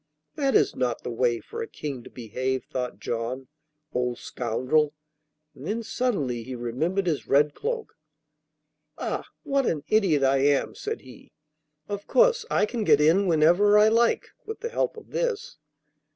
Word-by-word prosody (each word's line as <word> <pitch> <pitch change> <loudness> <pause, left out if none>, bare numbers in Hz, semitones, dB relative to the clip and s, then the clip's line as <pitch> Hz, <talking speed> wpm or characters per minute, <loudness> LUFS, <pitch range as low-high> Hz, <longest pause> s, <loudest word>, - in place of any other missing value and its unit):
'That 275 -3 0
is - - +3
not 125 -2 -1
the - - -4
way 120 0 +1
for 460 +1 -7
a 455 - -4
King 140 - -6
to - - -11
behave,' 130 +3 -3
thought 125 -1 -4
John. 120 +3 -3 0.5
'Old 125 -1 -1
scoundrel!' 130 +6 0 0.6
and 135 +4 -10
then 230 +3 -2
suddenly 195 - -1
he 130 +3 -7
remembered 155 +12 -1
his 160 -5 -1
red 145 +1 +4
cloak. 465 -1 -4 1.0
'Ah, - - -3 0.2
what 275 -4 +1
an 150 -3 -1
idiot 190 -10 +3
I 135 0 +4
am!' 140 +1 +2
said 440 +1 -5
he. - - -15 0.5
'Of 205 0 -5
course - - +4
I - - +3
can 225 +1 -3
get 145 - +5
in 170 +6 +4
whenever 175 +6 +5
I 210 +1 +6
like 230 +1 +2
with 445 +1 -7
the 465 - -3
help 470 - -1
of 450 - -12
this. 485 - -2
155 Hz, 165 wpm, -26 LUFS, -, 1.0 s, I